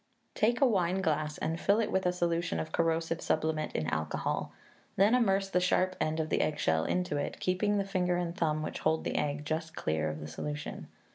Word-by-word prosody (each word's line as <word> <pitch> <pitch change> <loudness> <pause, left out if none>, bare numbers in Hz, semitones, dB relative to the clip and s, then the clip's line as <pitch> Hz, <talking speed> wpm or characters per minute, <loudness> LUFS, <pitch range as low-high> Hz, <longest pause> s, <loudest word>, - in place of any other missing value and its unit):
Take 235 +4 +1
a - - +7
wineglass 175 - +1
and 165 +1 -2
fill 200 +4 +3
it 225 - 0
with 190 -1 +1
a - - +3
solution 170 -1 0
of 155 - -4
corrosive 165 0 0
sublimate 155 0 0
in 80 - -1
alcohol, 80 -1 -2 0.4
then 200 +4 +4
immerse 195 -6 +3
the 180 - +3
sharp 185 +1 +2
end 155 +1 0
of 155 0 -1
the - - +2
eggshell 80 - +1
into 180 -5 0
it, 145 - -3
keeping 205 +3 +1
the 200 - 0
finger 180 -3 0
and 175 -1 -2
thumb 155 -4 0
which - - -4
hold 160 0 +1
the - - -3
egg 145 0 -1
just 160 +1 -3
clear 80 0 -1
of 75 0 -5
the 75 - -6
solution. 150 - -5
165 Hz, 205 wpm, -31 LUFS, 150-185 Hz, 0.4 s, a